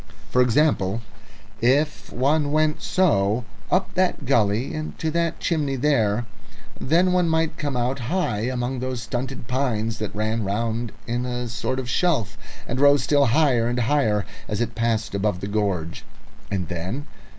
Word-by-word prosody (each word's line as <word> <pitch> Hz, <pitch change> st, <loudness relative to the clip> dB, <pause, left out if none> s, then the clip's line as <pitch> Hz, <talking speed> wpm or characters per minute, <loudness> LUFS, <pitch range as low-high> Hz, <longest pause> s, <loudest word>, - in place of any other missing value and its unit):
For 125 Hz, -, +4 dB
example, 120 Hz, -5 st, +2 dB, 0.6 s
if 145 Hz, +6 st, +1 dB
one 145 Hz, +3 st, +1 dB
went 155 Hz, 0 st, +1 dB
so, 115 Hz, -, +2 dB, 0.2 s
up 185 Hz, +1 st, +1 dB
that 185 Hz, -5 st, 0 dB
gully 115 Hz, -1 st, +2 dB
and 155 Hz, 0 st, -5 dB
to 160 Hz, -, -1 dB
that 170 Hz, 0 st, 0 dB
chimney 150 Hz, -5 st, 0 dB
there, 120 Hz, -5 st, +2 dB, 0.5 s
then 175 Hz, +6 st, +3 dB
one 180 Hz, -2 st, +3 dB
might 160 Hz, 0 st, +1 dB
come 145 Hz, -4 st, -2 dB
out 125 Hz, +3 st, 0 dB
high 120 Hz, -, -1 dB
among 125 Hz, 0 st, -2 dB
those 130 Hz, -1 st, -3 dB
stunted 125 Hz, +1 st, -4 dB
pines 115 Hz, -4 st, -1 dB
that 105 Hz, -2 st, -4 dB
ran 110 Hz, +1 st, -1 dB
round 115 Hz, +3 st, -1 dB
in 120 Hz, +1 st, -2 dB
a 125 Hz, 0 st, -3 dB
sort 120 Hz, +3 st, -2 dB
of 130 Hz, -2 st, -3 dB
shelf 125 Hz, -, +1 dB, 0.3 s
and 125 Hz, -, -2 dB
rose 145 Hz, 0 st, +5 dB
still 145 Hz, -2 st, +3 dB
higher 125 Hz, -3 st, +3 dB
and 120 Hz, +1 st, 0 dB
higher 110 Hz, -5 st, +2 dB, 0.2 s
as 105 Hz, -, -2 dB
it 120 Hz, -1 st, -1 dB
passed 115 Hz, -2 st, 0 dB
above 100 Hz, -2 st, 0 dB
the 100 Hz, -, -4 dB
gorge. 100 Hz, -6 st, -2 dB, 0.5 s
And 95 Hz, -4 st, -2 dB
then? 95 Hz, -, -4 dB
125 Hz, 160 wpm, -23 LUFS, 110-145 Hz, 0.6 s, rose